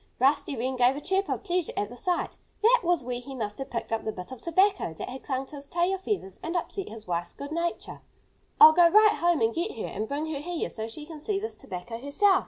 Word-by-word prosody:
Rusty 275 +2 +2
Wren 255 +2 -2
gave 250 +2 +4
a - - -4
chirp 385 +6 0
of - - -2
pleasure 360 -3 -1
at 205 - -1
the 245 - -10
sight. 355 +7 -1 0.3
That 485 +3 +6
was 345 -5 +2
where 245 0 -3
he 265 +2 -8
must 210 -2 -4
have 270 - -5
picked 235 - -4
up 225 - -1
the 220 - -2
bit 180 +3 -9
of 260 - -8
tobacco 370 - +2
that - - -6
had 260 +1 -7
clung 265 -1 -2
to 290 - -10
his 280 0 -7
tail 350 +4 +1
feathers 375 - -3
and 335 +2 -4
upset 370 +3 -3
his 220 0 -9
wife's 175 -1 -2
good 285 +1 -8
nature. 340 +1 -3 0.6
"I'll 315 - +11
go 340 +1 +6
right 425 +3 +6
home 345 -4 +2
and 225 0 +2
get 345 - -2
her - - -3
and 215 +3 -4
bring 290 +4 -2
her 285 - -3
here 340 +3 -3
so 220 0 -4
she 295 +7 -8
can 315 -1 -9
see 390 +6 -1
this 440 +2 -5
tobacco 190 +6 -7
herself!" 370 - +3
290 Hz, 255 wpm, -27 LUFS, 240-350 Hz, 0.6 s, I'll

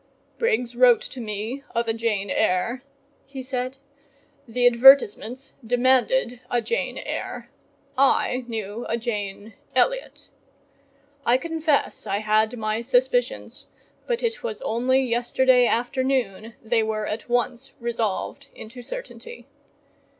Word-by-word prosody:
"Briggs 345 - 0
wrote 245 -2 +6
to 255 - -7
me 220 +5 -4
of 235 0 0
a 225 - +1
Jane 215 -4 -1
Eyre:" 185 +8 +1 0.5
he 270 -1 -7
said, 255 0 -3 0.7
"the 245 +2 0
advertisements 250 0 +5
demanded 250 - +2
a 245 - +1
Jane 465 - -2
Eyre: - - -5 0.4
I 260 -1 +3
knew 220 0 -5
a 230 - 0
Jane 210 -2 -4 0.2
Elliott.—I 280 - -3
confess 320 0 -1
I 195 - 0
had 215 +2 +1
my 215 0 -1
suspicions, - - 0 0.4
but 480 0 -1
it 465 0 -1
was 465 -2 -4
only 260 - +1
yesterday 245 +1 +3
afternoon 240 -3 -1
they 225 0 +2
were 215 -1 -2
at 220 +3 -5
once 245 +1 -1
resolved 235 +3 -3
into 235 +3 -10
certainty. 475 - -9
245 Hz, 115 wpm, -24 LUFS, 225-275 Hz, 0.7 s, wrote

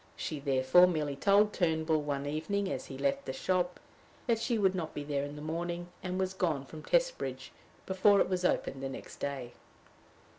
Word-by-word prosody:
She 155 - -4
therefore 135 +5 +5
merely 150 -5 -1
told 205 +7 +4
Turnbull, 160 -2 +1
one 140 -1 -2
evening 190 +7 -1
as - - -4
he 135 - -7
left 140 0 0
the 130 - -3
shop, 180 +5 0 0.5
that 230 -3 +2
she 235 0 0
would 190 -3 +3
not 170 -4 -4
be 145 - -3
there 145 -1 -1
in 145 +1 -6
the 150 - -8
morning, 170 +2 -3
and 185 0 -3
was 190 0 -1
gone 165 -8 -1
from 155 +2 -10
Testbridge - - 0 0.3
before 195 +2 +4
it - - +3
was 185 -1 -1
opened 135 -6 0
the 135 - -3
next 135 - -9
day. 135 -4 -4
160 Hz, 190 wpm, -31 LUFS, 145-190 Hz, 0.5 s, therefore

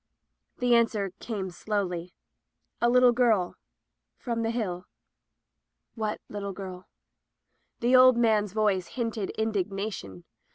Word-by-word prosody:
The 245 -2 +2
answer 220 -4 +2
came 195 -5 -4
slowly 180 -3 -3 0.3
— - - -50
"A 235 - +4
little 250 0 +6
girl— 225 -7 +2 0.6
from 235 -2 -3
the 225 - 0
Hill." 205 -6 -3 1.1
"What 215 -2 -3
little 200 -1 -5
girl?" 185 -1 -8 0.9
The 245 +2 +4
old 255 -1 +7
man's 215 -4 +2
voice 205 -4 +1
hinted 225 -5 -3
indignation. 195 - -3
215 Hz, 115 wpm, -27 LUFS, 190-235 Hz, 1.1 s, old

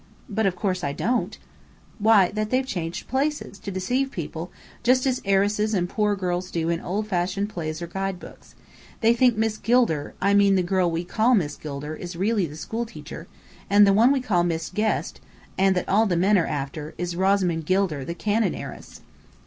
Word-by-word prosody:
"But 220 -2 0
of 185 - -1
course 185 -1 -2
I 140 - -1
don't." 240 - -1 0.6
"Why, 210 -4 +5
that 215 +1 -2
they've 255 +2 +1
changed 175 -8 -4
places, 270 -5 -2
to 200 - -7
deceive 245 +9 -1
people, 170 - -6 0.3
just 255 +2 +3
as 260 -1 0
heiresses 205 +2 +1
and 175 -2 0
poor 210 +2 0
girls 180 -1 -2
do 165 -2 -2
in 170 0 -1
old 205 +4 -2
fashioned 195 +1 -1
plays 160 -3 -5
or 195 +3 -3
books. 180 - -14 0.5
They 225 0 +5
think 240 -1 +3
Miss 220 -1 0
Gilder 225 -12 +1
(I 200 +2 +2
mean 200 -1 +5
the 185 - +2
girl 180 0 +1
we 165 +1 -2
call 220 +8 +2
Miss 150 -8 0
Gilder) 150 +1 -6
is 175 +2 -7
really 200 +1 +1
the 150 - -10
school 230 +7 -4
teacher, 165 -4 -10 0.4
and 205 +1 +7
the 195 - +4
one 230 +6 +5
we 275 -2 +1
call 190 -8 +1
Miss 165 -1 -2
Guest, 215 +2 -1 0.3
and 190 0 +3
that 180 - -1
all 215 +3 +3
the 175 -3 0
men 195 +4 +3
are 175 -4 +2
after, 145 +1 -5
is 175 0 -3
Rosamond 185 -4 +1
Gilder 185 -7 +1
the 170 +6 -5
cannon 215 +4 0
heiress." - - -9
195 Hz, 195 wpm, -24 LUFS, 170-215 Hz, 0.6 s, and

